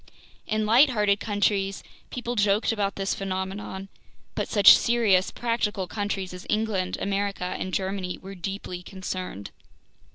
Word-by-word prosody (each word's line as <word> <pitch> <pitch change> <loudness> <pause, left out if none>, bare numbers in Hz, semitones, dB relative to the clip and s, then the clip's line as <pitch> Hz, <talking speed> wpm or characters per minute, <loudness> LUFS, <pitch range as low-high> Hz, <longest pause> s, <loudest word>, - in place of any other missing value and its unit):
In 215 0 0
lighthearted 215 -4 +4
countries, 200 -2 0 0.3
people 245 -1 -4
joked 205 +1 +2
about 205 -3 -1
this 195 0 -1
phenomenon, 190 0 -4 0.5
but - - -2
such 205 -2 +9
serious, 220 -6 +3
practical 230 -5 -1
countries 195 -1 -3
as 180 +1 -9
England, 210 -4 0
America, 200 -1 -1 0.2
and 185 - -3
Germany 190 -1 -2
were 195 +1 -9
deeply 190 -1 -5
concerned. 185 - -6
200 Hz, 125 wpm, -26 LUFS, 190-210 Hz, 0.5 s, such